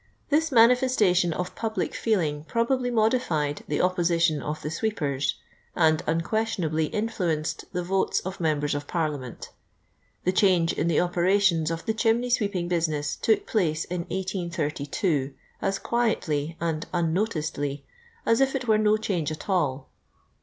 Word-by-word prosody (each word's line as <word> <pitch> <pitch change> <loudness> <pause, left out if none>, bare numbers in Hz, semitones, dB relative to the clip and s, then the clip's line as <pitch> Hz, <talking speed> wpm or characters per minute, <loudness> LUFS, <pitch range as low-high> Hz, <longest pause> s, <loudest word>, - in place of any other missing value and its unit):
This 320 +2 +2
manifestation 230 -7 +4
of 180 +3 -3
public 220 -1 -2
feeling 160 -10 0
probably 245 +5 0
modified, 215 - +1
the 150 - 0
opposition 170 -4 +2
of 150 +1 -4
the 150 - -3
sweepers, 150 -9 -1 0.4
and 160 -2 +3
un 165 +2 +1
questionably 170 -6 0
influenced 180 -8 -2
the 180 -1 -2
votes 190 +2 +1
of 190 +1 -6
members 150 -3 0
of 145 0 -4
Parliament 150 -7 -3 0.7
The 185 - +2
change 185 -3 +3
in 165 - -1
the 165 - +3
operations 175 -2 +2
of 165 0 -4
the 220 - 0
chimney 230 +3 +1
sweeping 200 -7 0
business 160 -4 -1
took 220 - +1
place 165 -7 0
in 180 0 -4
1832, 170 -5 -2 0.3
as 195 - 0
quietly 165 -11 -1
and 160 -2 -2
unnoticcdly 160 -5 -1 0.4
as 230 +3 +3
if 270 0 +2
it 255 -2 -3
were 215 -1 +4
no 215 0 +3
change 180 -8 -2
at 155 - -7
all. 145 -8 0
175 Hz, 140 wpm, -26 LUFS, 155-215 Hz, 0.7 s, manifestation